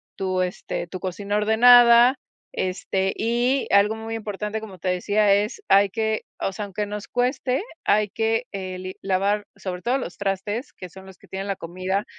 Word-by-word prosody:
tu, 185 -1 -1
este, 180 -1 -4
tu 185 - -7
cocina 200 +2 -3
ordenada. 240 +3 +7 0.4
Este, 190 +1 -1
y 240 +4 +1
algo 200 +2 +4
muy 225 0 -6
importante 210 -1 -4
como 210 -4 -10
te 185 +2 -3
decía 205 +3 +2
es 210 - 0
hay 200 0 +5
que 220 +1 -1
o 195 - -2
sea, 205 +2 -5
aunque 205 +1 -3
nos 205 0 -6
cueste, 255 +4 0 0.2
hay 210 0 +3
que 225 +3 0
eh, 185 -2 -5
li 185 0 -7
lavar 200 +2 0
sobre 180 -2 -6
todo 250 +6 +1
los 185 -9 -6
trastes, 200 +5 -3
que 180 - -10
son 190 +2 -13
los 190 -1 -14
que - - -21
tienen 195 +1 -5
la 195 - -1
comida 185 +3 -3
205 Hz, 180 wpm, -23 LUFS, 190-225 Hz, 0.4 s, ordenada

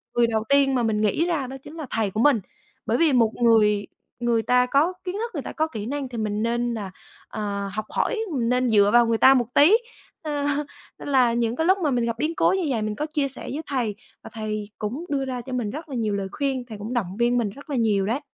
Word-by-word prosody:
người 240 -1 +4
đầu 220 -1 0
tiên 280 -1 +4
mà 245 - +1
mình 215 -2 0
nghĩ 215 - +2
ra 320 -7 -1
đó 270 +1 -7
chính 300 - -11
là 315 -2 -5
thầy 220 -3 -1
của 215 - -3
mình. 280 -5 +5 0.5
Bởi 230 - +1
vì 315 -1 +3
một 230 -3 +4
người 210 -3 +4 0.3
người 235 -1 +1
ta 250 +2 +3
có 290 +8 +2
kiến 365 +1 -4
thức, 460 +2 -3
người 290 - -3
ta - - -6
có 315 0 0
kỹ 220 -9 -6
năng 275 +2 -3
thì 240 - -7
mình 210 -1 -1
nên 240 +1 0
là, 205 -4 -5 0.4
ờ, 200 -2 -4
học 215 0 -3
hỏi, 455 - 0
mình 235 -4 0
nên 250 0 +2
dựa 205 -2 +5
vào 240 0 +6
người 230 0 +2
ta 265 +4 +7
một 245 -2 +2
tí, 330 +10 +6 0.4
ơ, 295 -2 -2 0.5
nên - - -8
là 255 -4 +3
những 235 0 0
cái 320 - 0
lúc 375 +2 +4
mà 295 - +2
mình 240 -2 +1
gặp 230 -1 -1
biến 310 +5 -1
cố - - +3
như 380 -1 0
vậy 230 -4 0
mình 215 0 -2
có 300 - -2
chia 300 -2 -1
sẻ 270 - -7
với 300 - -3
thầy 240 -7 -1 0.3
và - - -9
thầy 215 -1 -4
cũng 240 +10 -4
đưa 275 -2 -1
ra 255 -2 -4
cho 255 +2 -8
mình 240 -5 -1
rất 310 +5 -7
là 270 - -5
nhiều 220 -3 -1
lời 195 -1 -2
khuyên, 270 -3 -2
thầy 220 -3 -9
cũng 210 +4 -6
động 200 -6 -2
viên 240 +1 +2
mình 230 -4 0
rất 280 +9 -13
là 285 - -2
nhiều 215 -5 +2
đấy. 230 +7 0
240 Hz, 270 wpm, -24 LUFS, 220-280 Hz, 0.5 s, ta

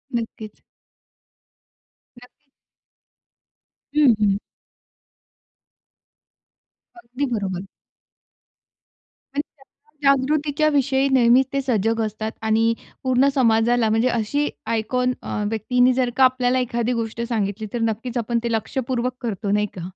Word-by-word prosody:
नक्कीच. 220 -2 -6 1.6
नक्की. 275 +3 -21 1.5
हं, 285 -6 +6
हं. 200 -2 +2 2.6
अगदी 255 0 -4
बरोबर. 190 -3 -3 1.7
आणि 290 - +1
त्याच्या 290 0 -3
जागृतीच्या 290 +2 +1
विषयी 275 -1 +2
नेहमीच 250 +1 +5
ते 275 - +1
सजग 225 -3 0
असतात. 215 +1 -4
आणि 225 +1 +2 0.3
पूर्ण 260 +1 +3
समाजाला, 230 -2 +3
म्हणजे 225 +3 +2
अशी 245 +6 0 0.2
आयकॉन 250 +3 0
अ, 210 - -3
व्यक्तीनी 245 +3 +2
जर 250 -1 +1
का 265 - +5
आपल्याला 255 0 +3
एखादी 240 0 -1
गोष्ट 230 0 -3
सांगितली, 215 -1 -2
तर 240 - -2
नक्कीच 230 +2 -2
आपण 235 0 0
ते 235 - -1
लक्षपूर्वक 245 +2 -2
करतो 210 -3 -3
नाही 210 0 +2
का? 175 +1 -5
240 Hz, 110 wpm, -22 LUFS, 220-260 Hz, 2.6 s, हं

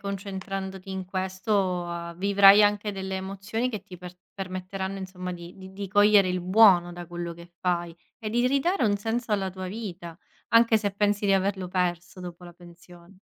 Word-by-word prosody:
concentrandoti 195 -1 -5
in 190 0 -4
questo 185 -2 -2
vivrai 200 +2 +7
anche 205 0 +1
delle 190 0 -4
emozioni 195 +5 -3
che 215 -5 -5
ti 180 - -11
per 180 0 -11 0.2
permetteranno 190 0 -5
insomma 185 -1 -6
di 175 0 -10
di 190 +1 -8
cogliere 205 0 +5
il 180 0 -1
buono 185 -2 +5
da 175 0 -8
quello 175 0 -5
che 170 +1 -14
fai 175 -2 -1 0.2
e 215 -3 -5
di 240 +2 +2
ridare 280 +6 +1
un 205 -2 +2
senso 225 +3 -3
alla 195 -2 0
tua 185 0 -7
vita, 180 -5 -7 0.3
anche 230 -1 +5
se 205 -1 -1
pensi 205 0 0
di 195 - +4
averlo 190 -1 0
perso 180 0 -2
dopo 175 0 -9
la 175 - -11
pensione. 175 +1 -17
190 Hz, 170 wpm, -26 LUFS, 180-205 Hz, 0.3 s, vivrai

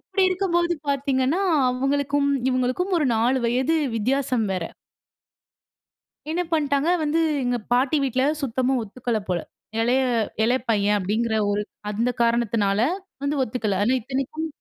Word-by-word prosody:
இப்டி 390 - -1
இருக்கும்போது 345 -2 +1 0.2
பார்த்தீங்கனா 275 +3 +1 0.3
அவங்களுக்கும் 280 +2 0 0.2
இவங்களுக்கும் 255 +9 0
ஒரு 300 - +1
4 245 +4 +2
வயது 255 +7 +1 0.2
வித்தியாசம் 255 +1 0
வேற. 180 -3 -2 1.7
என்ன 345 +2 0
பண்ட்டாங்க 290 0 +1
வந்து 305 +2 +1 0.2
எங்க 245 0 0 0.2
பாட்டி 260 +4 +2
வீட்ல 260 -1 0 0.2
சுத்தமா 260 0 0
ஒத்துக்கல 230 +1 -3
போல. 180 -1 +1 0.4
இளைய 245 +4 +2 0.4
இளைய 245 +3 +2
பையன் 210 -1 +2
அப்படிங்கிற 220 +4 -1 0.2
ஒரு 205 +1 0 0.3
அந்த 225 +4 0
காரணத்தினால 230 -4 +1 0.4
வந்து 285 +1 0
ஒத்துக்கல 215 -5 -2
ஆனா 240 +5 +2
இத்தனைக்கும் 275 +6 -3
255 Hz, 125 wpm, -23 LUFS, 225-280 Hz, 1.7 s, 4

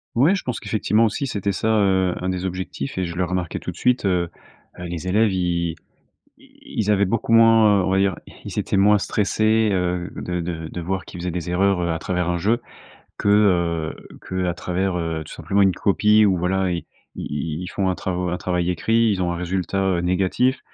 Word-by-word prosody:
Ouais, 140 +11 +4
je - - -4
pense 125 -3 -3
qu'effectivement 110 +1 +1
aussi, 115 +6 -1
c'était 100 -4 -2
ça, 100 - -2
heu, 95 -2 +2
un 90 - -2
des 95 0 -3
objectifs 90 -5 -5
et 95 - 0
je 85 0 -6
le 90 - 0
remarquais 90 -2 -2
tout - - -5
de - - -15
suite, 125 -3 +1
heu, 90 -3 +1 0.5
heu, 90 - -6
les 85 +1 -5
élèves, 105 +3 +3
ils 85 -2 -1 0.6
ils - - -11
ils 105 -1 +2
avaient 100 -1 +3
beaucoup 115 +3 -2
moins, 115 -3 +6
heu, - - -1
on - - -1
va 95 - +2
dire, 95 0 +2 0.3
ils - - -3
étaient - - -1
moins 105 +1 +5
stressés, 110 +2 +1
heu, 90 -1 -1
de 90 0 -3
de 85 -1 -5
de 90 - -6
voir 95 +2 -3
qu'ils 90 - -9
faisaient 90 +1 -3
des 90 0 -4
erreurs, 95 +1 +2
heu, 85 - -1
à 80 - -1
travers 90 +1 -2
un 85 - 0
jeu 110 +7 +1 0.6
que, 100 - 0
heu, 85 -6 +2 0.3
qu'à 90 -1 -1
travers, 90 +1 -2
heu, 80 -2 -3
tout - - -11
simplement 100 +1 0
une 95 -2 +4
copie 105 +2 +3
ou 95 -3 +2
voilà. 95 +2 0
Ils 85 - -3 0.3
ils 75 +3 -4
ils 90 - -5
font 95 0 -1
un 90 - 0
travaux 90 -1 -2
un 90 - -2
travail 90 -1 -1
écrit. 115 +6 +2
Ils 95 -2 -1
ont 85 - 0
un 85 - -2
résultat, 90 +2 -2 0.2
heu, - - -1
négatif. 95 +9 +1
95 Hz, 220 wpm, -22 LUFS, 90-100 Hz, 0.6 s, moins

